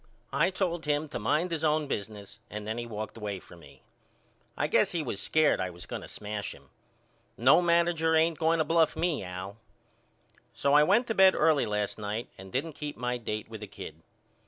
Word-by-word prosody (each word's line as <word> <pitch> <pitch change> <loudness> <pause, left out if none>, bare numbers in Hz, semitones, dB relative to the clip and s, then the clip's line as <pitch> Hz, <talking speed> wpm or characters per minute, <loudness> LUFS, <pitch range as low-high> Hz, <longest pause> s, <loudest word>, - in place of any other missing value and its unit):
I - - +3
told 175 -3 -2
him 150 +1 +1
to - - -4
mind 150 +11 +1
his 160 -1 -2
own 155 -1 +2
business 105 -5 -6
and 105 0 -6
then 110 +2 -3
he 120 - -5
walked 110 0 -6
away 105 -3 -4
from 85 - -15
me. - - -17 0.7
I - - +1
guess - - +2
he 165 -3 -1
was 105 -7 -4
scared 155 -1 +3
I 95 - -1
was 90 0 -9
going - - -5
to - - -9
smash 105 0 -5
him. - - -20 0.7
No 130 +8 +6
manager 170 -1 +3
ain't 160 -1 +3
going 165 +1 +3
to 160 - +3
bluff 165 -1 +3
me 165 - 0
Al. 95 +3 -7 1.0
So 140 - +1
I 150 - +8
went 200 +11 +4
to 225 - -1
bed 190 -2 +6
early 155 -2 +3
last 105 0 -2
night 105 +3 -4
and 95 0 -11
didn't 150 +5 -2
keep 150 0 -6
my 125 0 -2
date 110 -2 -4
with 110 -1 -9
the 105 - -6
kid. 80 -4 -10
140 Hz, 205 wpm, -29 LUFS, 105-160 Hz, 1.0 s, I